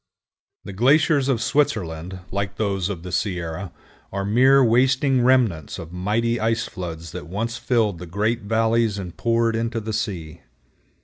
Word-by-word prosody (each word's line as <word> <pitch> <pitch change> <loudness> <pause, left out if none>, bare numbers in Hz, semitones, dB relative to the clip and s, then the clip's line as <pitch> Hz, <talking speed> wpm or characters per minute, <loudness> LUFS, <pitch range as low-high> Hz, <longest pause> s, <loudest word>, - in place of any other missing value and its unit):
The 100 - -8
glaciers 140 +5 +3
of 120 -4 +1
Switzerland, 95 - -1
like 100 0 -2
those 100 -3 -1
of 90 -5 -5
the 90 - -7
Sierra, 90 -1 -3 0.4
are 100 0 -3
mere 130 +6 +5
wasting 130 +2 +3
remnants 120 - +2
of 80 0 -8
mighty 110 +6 0
ice 115 +1 0
floods 85 -4 -7
that 90 -1 -7
once 110 +6 -3
filled 110 -9 0
the 90 - -8
great 105 +7 -1
valleys 110 0 +1
and 90 -3 -6
poured 115 -1 +1
into 115 0 -1
the 110 0 -5
sea. 85 -7 -4
110 Hz, 150 wpm, -23 LUFS, 90-115 Hz, 0.4 s, mere